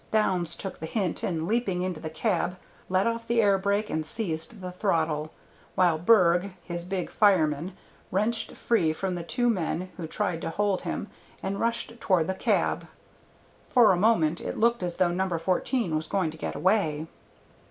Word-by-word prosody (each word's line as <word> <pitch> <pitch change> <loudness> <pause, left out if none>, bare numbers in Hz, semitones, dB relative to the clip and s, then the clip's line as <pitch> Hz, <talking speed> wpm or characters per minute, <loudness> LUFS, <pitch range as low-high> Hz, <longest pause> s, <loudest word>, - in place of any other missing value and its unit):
Downs 185 -6 +1
took 195 - -6
the 160 - -5
hint 190 -2 -1
and, 165 -2 -2
leaping 200 -5 0
into 180 -4 -3
the 155 - -5
cab, 180 0 -1 0.3
let 185 +1 +2
off 230 0 -2
the 235 0 +2
air 200 -3 +4
brake 200 +2 0
and 155 - -1
seized 170 +2 -4
the 185 -1 -6
throttle, 160 -5 0 0.5
while 175 -4 +3
Berg, 180 -1 +4
his 170 -1 -5
big 185 0 -3
fireman, 180 -4 +2 0.3
wrenched 215 +4 0
free 180 -10 +1
from 185 +3 -2
the 175 - -3
two 240 +9 0
men 185 -4 -1
who 170 -3 -5
tried 180 -2 -2
to - - -3
hold 200 +2 0
him - - -4 0.4
and 195 +1 -2
rushed 230 0 -2
toward 180 -5 +3
the 190 - -1
cab. - - 0 0.8
For 240 -5 +6
a - - +4
moment 175 -5 +2
it - - -4
looked 235 0 +2
as 175 -1 -2
though 175 -2 +2
No. 190 +2 0
14 185 - 0
was 155 +1 -2
going 185 -5 0
to 160 - -11
get - - -4
away. 165 -6 +1
185 Hz, 180 wpm, -27 LUFS, 165-210 Hz, 0.8 s, For